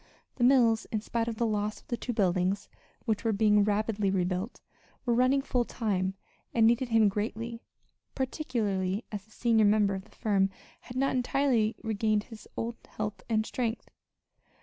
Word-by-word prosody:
The 245 - 0
mills, 240 -4 +5
in 220 - 0
spite 230 +1 -2
of 230 - -2
the 235 - 0
loss 210 -1 -1
of - - -26
the 240 - 0
two 245 - -4
buildings 190 -2 +1 0.4
(which 220 -2 0
were 225 - +2
being 210 0 +4
rapidly 210 0 +1
rebuilt) 185 +3 -1 0.5
were 240 - +2
running 255 +3 +3
full 245 -2 +1
time, 195 -6 -1 0.4
and 225 -1 +5
needed 240 +2 +3
him 225 -2 +5
greatly, 230 +3 -3 0.5
particularly 220 -8 -1
as 205 -2 -5
the 220 - -27
senior 225 -1 +3
member 205 -1 +4
of 190 0 -5
the - - -22
firm 195 -3 +2 0.3
had 250 - -9
not 270 0 +1
entirely 250 -3 +2
regained 215 -1 +1
his 225 -1 -12
old 230 0 -3
health 210 - -5
and 220 -1 +2
strength. 235 -1 -3
220 Hz, 170 wpm, -29 LUFS, 205-235 Hz, 0.5 s, mills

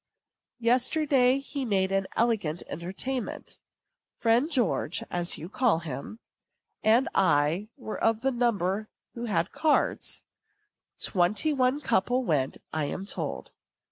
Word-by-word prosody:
Yesterday 255 +2 +3
he 275 0 -4
made 195 -5 +1
an 195 0 +1
elegant 210 -9 +1
entertainment. 195 - -5 0.6
Friend 235 +5 +3
George 240 - 0
(as 175 0 -1
you 165 - -7
call 225 -1 +2
him) 155 +4 -6 0.6
and 230 +5 +4
I 165 +5 +2
were 225 -5 -6
of 225 0 +2
the 270 +1 +1
number 215 -4 0 0.2
who 235 0 -5
had 170 -5 0
cards. 310 -2 +1 0.8
Twenty 205 - +1
one 260 +1 +2
couple 245 +3 +1
went, 145 - 0 0.2
I 155 -2 0
am 190 +6 -4
told. - - -4
220 Hz, 120 wpm, -28 LUFS, 180-255 Hz, 0.8 s, and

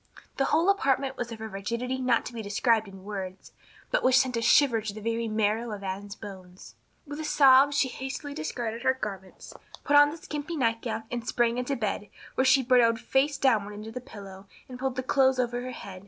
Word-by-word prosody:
The 270 - +2
whole 330 +6 +2
apartment 270 -7 0
was 240 -2 -5
of 225 - -7
a 220 - -4
rigidity 235 +6 -3
not 250 -2 +1
to 245 - -7
be 230 - -5
described 220 +2 +1
in 195 -1 -12
words, 195 -2 -7 0.4
but - - +2
which 255 0 +4
sent 260 -2 +2
a 230 - -1
shiver 235 -1 +4
to 210 -1 -5
the - - -7
very 230 +1 -2
marrow 220 +2 0
of 205 -2 -6
Anne's 195 +1 -5
bones. 185 -3 -11 0.3
With 290 0 -7
a - - -4
sob 275 -2 +6
she 280 -2 +2
hastily 270 +3 -6
discarded 240 -7 -4
her 260 +1 +2
garments, 195 -6 -8 0.3
put 290 - +2
on 290 0 +8
the 310 - -7
skimpy 300 +1 -5
nightgown 230 -2 -1
and 240 -1 -4
sprang 240 0 +1
into 250 +3 -2
bed 210 -3 -3 0.2
where 260 - +1
she 265 0 +5
burrowed 235 -2 +4
face 275 +4 +1
downward 215 -6 +1
into 215 +2 -8
the 250 - -6
pillow 200 -5 -11 0.2
and 250 -1 -9
pulled 265 -1 -2
the 255 - -2
clothes 265 0 +3
over 245 -1 -1
her 255 - -5
head. 200 -6 -9
240 Hz, 215 wpm, -27 LUFS, 215-265 Hz, 0.4 s, on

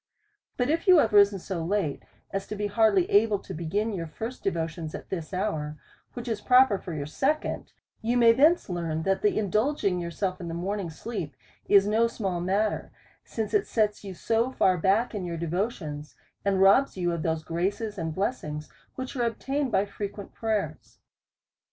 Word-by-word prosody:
But 250 +3 +1
if 330 +5 -1
you 365 -2 +8
have 225 -8 +3
risen 200 -1 +6
so 180 -2 -4
late, 170 -5 -1 0.3
as 195 0 -3
to 210 - -5
be 210 0 -2
hardly 205 -3 +3
able 210 0 +4
to 190 - -9
begin 200 +7 -1
your 170 -4 -4
first 225 +10 -7
devotions 165 -3 -2
at - - -9
this 170 -4 -4
hour, 160 -6 -2 0.4
which 240 0 -7
is 220 -3 -2
proper 250 -6 +5
for 180 - -7
your 145 -2 -3
second, 280 - -1 0.3
you 235 +2 +1
may 235 -1 +7
thence 305 +9 +4
learn 165 -3 -2
that 195 +1 +1
the 210 - +2
in 205 -4 -1
dulging 215 -5 +1
yourself 180 +2 -3
in 170 - -5
the 165 - -4
morning 190 +1 -3
sleep 165 - -6 0.3
is 200 -1 +6
no 220 +3 +3
small 195 -6 -3
mat 200 +4 +1
ter, - - -7 0.3
since 220 -2 -4
it 415 - +2
sets 210 -2 0
you 195 -2 -7
so 230 +6 0
tar 185 -6 +3
back 195 +8 +2
in 205 -3 -3
your 170 -1 -4
devotions, 160 - -3 0.3
and 195 -1 +2
robs 200 +5 +5
you 175 -1 0
of 170 -1 -2
those 160 0 -1
graces 200 +6 -2
and 160 -1 -3
blessings, 155 -8 -3 0.3
which 260 +1 -6
are 250 - -1
obtained 270 +4 -2
by 195 - +2
frequent 200 0 -7
prayers. 220 -3 -3
200 Hz, 190 wpm, -27 LUFS, 170-225 Hz, 0.4 s, you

